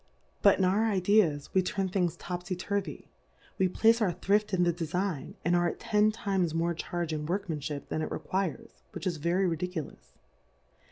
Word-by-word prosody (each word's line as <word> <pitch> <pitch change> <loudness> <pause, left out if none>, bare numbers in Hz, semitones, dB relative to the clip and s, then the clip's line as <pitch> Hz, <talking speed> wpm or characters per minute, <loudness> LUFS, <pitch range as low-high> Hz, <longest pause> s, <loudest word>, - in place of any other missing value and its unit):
But 200 - +6
in 190 - +2
our 200 +5 +2
Ideas 185 -7 +2
we 190 - +4
turn 190 +1 -1
Things 180 -3 0
topfy 180 +1 -4
turvy, 200 +2 -4 0.5
we 190 - +4
place 225 +5 +3
our 200 -5 +3
thrift 200 +4 +1
in 180 -2 +2
the 175 -1 +2
Defign, 175 -1 -3
and 175 +1 +3
ai*e 175 0 +3
at - - -18
ten 215 -2 +3
times 190 -6 -1
more 170 +1 +1
Charge 170 0 -3
in 150 -1 -3
WorkmanPnip 155 -6 -3
than 155 - -1
it - - -2
requires, 190 -4 -3 0.2
which - - -6
is 175 -3 -1
very 170 +5 +1
ridiculous. 170 -2 -4
180 Hz, 175 wpm, -29 LUFS, 170-195 Hz, 0.5 s, But